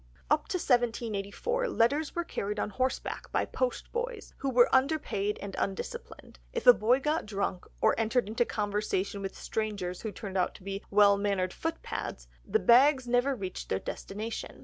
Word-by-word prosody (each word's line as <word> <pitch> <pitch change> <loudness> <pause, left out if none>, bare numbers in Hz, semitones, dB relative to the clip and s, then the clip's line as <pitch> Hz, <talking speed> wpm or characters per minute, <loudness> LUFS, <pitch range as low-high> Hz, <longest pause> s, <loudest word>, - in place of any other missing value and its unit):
Up 300 0 +3
to 365 - -1
1784, 240 - 0
letters 290 - +1
were 345 - 0
carried 210 -9 -3
on 210 - -2
horseback 255 +6 -2
by - - +1
post - - -2
boys, 480 -2 -4
who 275 - -2
were 245 -2 +5
underpaid 260 -7 +1
and 200 -1 -6
undisciplined; 190 - -5
if - - -3
a 245 - +11
boy 240 +4 +3
got 300 -2 -1
drunk, 200 -3 -2 0.2
or - - +5
entered 225 0 +1
into 225 +3 +1
conversation 205 -2 -2
with 195 -1 -5
strangers 200 -5 -3
who 220 - -4
turned 195 -1 -4
out 180 - 0
to - - -13
be 195 +1 -5
well 200 0 +6
mannered 195 -3 0
footpads, 325 0 -4 0.2
the - - +1
bags 260 - +5
never 245 +3 +2
reached 190 -5 -6
their 95 - +1
destination. 215 - -6
225 Hz, 170 wpm, -30 LUFS, 200-275 Hz, 0.2 s, a